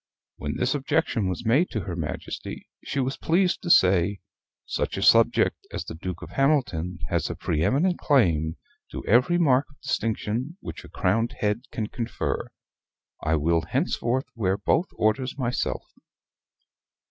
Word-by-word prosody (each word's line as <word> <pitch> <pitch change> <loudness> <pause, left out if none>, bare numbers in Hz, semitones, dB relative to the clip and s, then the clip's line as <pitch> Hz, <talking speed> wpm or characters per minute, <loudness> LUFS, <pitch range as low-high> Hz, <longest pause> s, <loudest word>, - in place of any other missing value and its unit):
When 75 -1 -4
this 130 - +1
objection 125 -7 0
was 95 +5 -4
made 135 +11 +3
to 110 - -2
her 90 -3 -5
Majesty, 80 -3 -5 0.2
she 140 - -3
was 130 +1 -1
pleased 180 +2 +2
to 175 - -5
say, 95 - +4 0.5
"Such - - -2
a - - -1
subject - - +5
as - - -4
the - - -6
Duke 90 +1 -6
of - - -9
Hamilton 105 - +1
has - - 0
a - - -4
pre 75 - -1
eminent 170 - +2
claim 80 - +2 0.3
to - - -7
every 125 +10 +4
mark 140 -5 +3
of 140 - -23
distinction 115 - -2
which - - -8
a - - -12
crowned 115 +6 0
head 105 +4 -1
can 110 - -2
confer. 115 +2 -3 0.7
I 80 +1 +1
will 80 +2 +2
henceforth 125 - -1
wear 100 -4 0
both 160 - +1
orders 125 +5 0
myself." 125 -2 -1
115 Hz, 155 wpm, -25 LUFS, 90-135 Hz, 0.7 s, subject